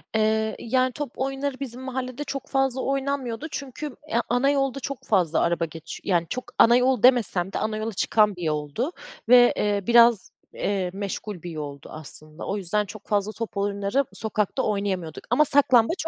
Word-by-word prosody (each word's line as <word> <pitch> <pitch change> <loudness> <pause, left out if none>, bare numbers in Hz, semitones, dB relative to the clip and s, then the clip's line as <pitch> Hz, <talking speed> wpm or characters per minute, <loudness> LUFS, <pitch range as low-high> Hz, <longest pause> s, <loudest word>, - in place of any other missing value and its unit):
Eee, 220 0 +1
yani 255 +2 +1
top 290 -1 -5
oyunları 270 0 -3
bizim 255 -2 -5
mahallede 260 +1 -4
çok 275 -1 -5
fazla 270 -1 0
oynanmıyordu 275 -1 -2
çünkü, 280 +1 -6
eee, 235 - +2
ana 245 +3 +3
yolda 275 -1 0
çok 275 0 -6
fazla 175 -6 +2
araba 170 0 +1
geçi 165 0 -9
Yani 170 -4 +1
çok 255 - -3
ana 235 +1 +7
yol 250 -2 +2
demesem 210 -7 +4
de - - -1
ana 215 0 -2
yola 220 0 -3
çıkan 210 +1 +2
bir 180 - -10
yoldu 150 - -2 0.4
ve, 245 0 +7
eee, 205 -1 0
biraz, 235 -3 +5 0.2
eee, 195 -3 -1
meşgul 200 -2 -5
bir 175 - -6
yoldu 145 -3 -7
aslında. 155 0 -9
O 200 - -1
yüzden 205 +2 0
çok 215 +1 -11
fazla 205 0 0
top 225 -2 -6
oyunları 200 +6 0
sokakta 215 +3 -1
oynayamıyorduk 195 -6 -2
ama 250 +6 +4
saklambaç 280 +3 +3
220 Hz, 170 wpm, -25 LUFS, 195-260 Hz, 0.4 s, ana